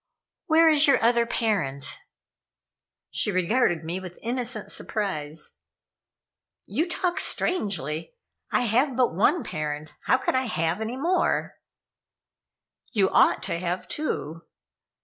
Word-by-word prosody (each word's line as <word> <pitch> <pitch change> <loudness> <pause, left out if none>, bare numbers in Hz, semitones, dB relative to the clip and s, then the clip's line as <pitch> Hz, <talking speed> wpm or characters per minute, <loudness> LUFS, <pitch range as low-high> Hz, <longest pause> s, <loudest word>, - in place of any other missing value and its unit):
"Where 325 +1 +6
is 305 -1 +5
your 275 -2 +5
other 235 0 +3
parent?" 150 - -1 1.1
She 210 - 0
regarded 185 -1 +1
me 170 +3 -3
with 180 -2 -9
innocent 240 -2 -3
surprise. 155 - -4 1.1
"You 305 - -1
talk 355 0 -1
strangely. 175 - -1 0.3
I - - +2
have 245 +4 +2
but 250 -5 +2
one 220 - +2
parent. 150 -2 -4
How - - +4
could 260 - -1
I 260 -1 +1
have 175 -2 -1
any 230 +3 -3
more?" 345 +7 0 1.3
"You 195 -3 +2
ought - - +4
to 170 - -2
have 180 +1 -3
two." 165 - -3
215 Hz, 120 wpm, -26 LUFS, 165-260 Hz, 1.3 s, Where